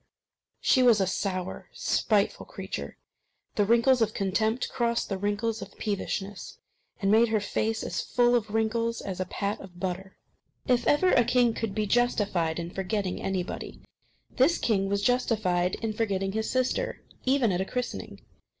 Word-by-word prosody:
She 260 Hz, -, +4 dB
was 240 Hz, -4 st, +6 dB
a 190 Hz, -, +3 dB
sour, 185 Hz, 0 st, -3 dB
spiteful -, -, +1 dB
creature. -, -, -6 dB, 0.6 s
The 205 Hz, -, +2 dB
wrinkles 235 Hz, +3 st, +4 dB
of 220 Hz, -1 st, +1 dB
contempt 220 Hz, +5 st, 0 dB
crossed 235 Hz, -1 st, -1 dB
the 195 Hz, -, -1 dB
wrinkles 215 Hz, +3 st, -1 dB
of -, -, -10 dB
peevishness, 200 Hz, -1 st, -4 dB, 0.4 s
and 195 Hz, -2 st, +1 dB
made 225 Hz, +2 st, +6 dB
her 220 Hz, -1 st, +1 dB
face 220 Hz, +2 st, -1 dB
as -, -, -2 dB
full 245 Hz, -1 st, +2 dB
of 225 Hz, -3 st, +1 dB
wrinkles 225 Hz, +2 st, 0 dB
as 190 Hz, -2 st, -5 dB
a 185 Hz, -, 0 dB
pat 200 Hz, +2 st, -3 dB
of 175 Hz, -2 st, -12 dB
butter. 190 Hz, +1 st, -4 dB, 0.5 s
If 245 Hz, -1 st, +2 dB
ever 365 Hz, +5 st, +4 dB
a 245 Hz, -, +5 dB
king 245 Hz, -1 st, +3 dB
could 220 Hz, -4 st, -3 dB
be 215 Hz, -1 st, 0 dB
justified 200 Hz, -8 st, +1 dB
in 170 Hz, 0 st, -4 dB
forgetting 190 Hz, 0 st, -2 dB
anybody, 190 Hz, -1 st, -4 dB, 0.6 s
this 280 Hz, +7 st, +4 dB
king 195 Hz, -4 st, +1 dB
was 200 Hz, 0 st, 0 dB
justified 205 Hz, -8 st, +1 dB
in 220 Hz, -1 st, -1 dB
forgetting 195 Hz, -3 st, -1 dB
his 220 Hz, +2 st, -2 dB
sister, 255 Hz, -, -1 dB, 0.2 s
even 260 Hz, -4 st, +3 dB
at 180 Hz, 0 st, 0 dB
a -, -, -1 dB
christening. 250 Hz, +4 st, -5 dB
215 Hz, 160 wpm, -28 LUFS, 195-235 Hz, 0.6 s, was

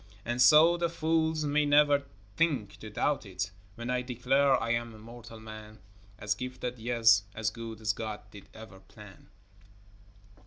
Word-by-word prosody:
And 120 Hz, +2 st, -1 dB
so 155 Hz, +6 st, +7 dB
the 170 Hz, -1 st, 0 dB
fools 160 Hz, -1 st, 0 dB
may 150 Hz, +1 st, +2 dB
never 145 Hz, -1 st, +4 dB, 0.3 s
think 140 Hz, -12 st, 0 dB
to 110 Hz, -, -9 dB
doubt 140 Hz, +7 st, -1 dB
it, 95 Hz, -2 st, -5 dB, 0.2 s
When 120 Hz, +1 st, -5 dB
I 125 Hz, 0 st, 0 dB
declare 130 Hz, +3 st, +2 dB
I 115 Hz, -, -2 dB
am 115 Hz, -1 st, -2 dB
a -, -, -12 dB
moral 115 Hz, 0 st, -12 dB
man, 110 Hz, -1 st, -11 dB, 0.4 s
As 105 Hz, 0 st, -1 dB
gifted, 125 Hz, +1 st, -6 dB
yet 115 Hz, -2 st, +4 dB
as 110 Hz, 0 st, -1 dB
good 115 Hz, -1 st, -8 dB
as 105 Hz, -1 st, 0 dB
God 110 Hz, -1 st, -6 dB
did 100 Hz, -, -13 dB
ever 110 Hz, -4 st, -12 dB
plan. 100 Hz, 0 st, -16 dB
120 Hz, 160 wpm, -29 LUFS, 110-140 Hz, 0.4 s, so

